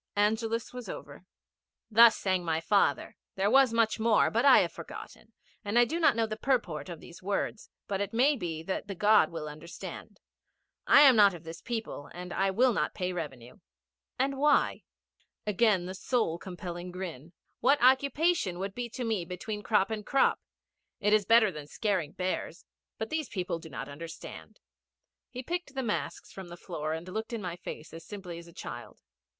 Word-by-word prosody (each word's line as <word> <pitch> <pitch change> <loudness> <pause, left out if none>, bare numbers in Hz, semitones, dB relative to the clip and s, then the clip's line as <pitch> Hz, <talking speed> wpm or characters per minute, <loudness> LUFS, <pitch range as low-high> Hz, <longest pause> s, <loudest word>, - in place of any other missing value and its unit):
Angelus 220 +3 0
was 250 -1 -7
over. - - -9 0.6
'Thus 230 0 +6
my 175 -4 +1
father 165 -5 +2
sang. - - -16 0.2
There 195 +2 +1
was 270 -2 +6
much 230 -1 +2
more, 220 -1 +3
but 230 +2 +1
I 275 - +8
have - - -1
forgotten, - - -10 0.3
and 205 +2 -1
I 240 - +7
do 325 +8 -3
not 320 - +4
know 230 -1 +2
the 215 -1 -4
purport 220 - -1
of 170 -3 -7
these 175 +2 -13
words, 200 +2 -3 0.2
but 195 -1 -2
it 200 0 -2
may 265 +6 +3
be 165 - -4
that 190 +3 -3
the 200 - -5
God 210 -2 +5
will 160 -2 -6
understand. 155 +3 -9 0.7
I - - +8
am 270 -4 +8
not 200 -4 +6
of 170 - -11
this 165 +1 -9
people, 225 - -5
and 180 0 -7
I 195 0 +1
will 240 +6 +3
not - - -1
pay 180 0 -2
revenue.' 135 - -7 0.6
'And 270 +1 0
why?' 295 +1 +3 0.6
Again 210 -3 +2
that 185 - -5
soul 220 -10 0
compelling 175 -1 -7
grin. 175 -4 -7 0.3
'What 275 +5 +4
occupation 265 - +3
would 195 +1 -4
be 240 +1 -4
to 250 - -5
me 220 -6 -1
between 190 +5 -5
crop 210 -1 +2
and 215 -1 -3
crop? 275 +5 +2 0.6
It 210 0 +2
is 215 -2 +4
better 220 -1 +5
than 150 -3 -9
scaring 185 -4 -1
bears. 185 -1 -3 0.3
But 220 - -5
these 315 -5 -2
people 180 -4 -3
do 160 - -11
not - - -6
understand.' 155 +3 -9 0.7
He 255 0 -7
picked 345 -1 -4
the 265 - -1
masks 215 -3 -3
from 190 -2 -9
the 175 0 -10
floor, 155 -4 -4
and 165 +2 -6
looked 220 +5 -5
in 230 - -3
my 175 -2 -4
face 165 -3 -9
as 165 0 -9
simply 180 -3 -8
as 170 - -13
a - - -13
child. - - -9
200 Hz, 190 wpm, -29 LUFS, 175-230 Hz, 0.7 s, I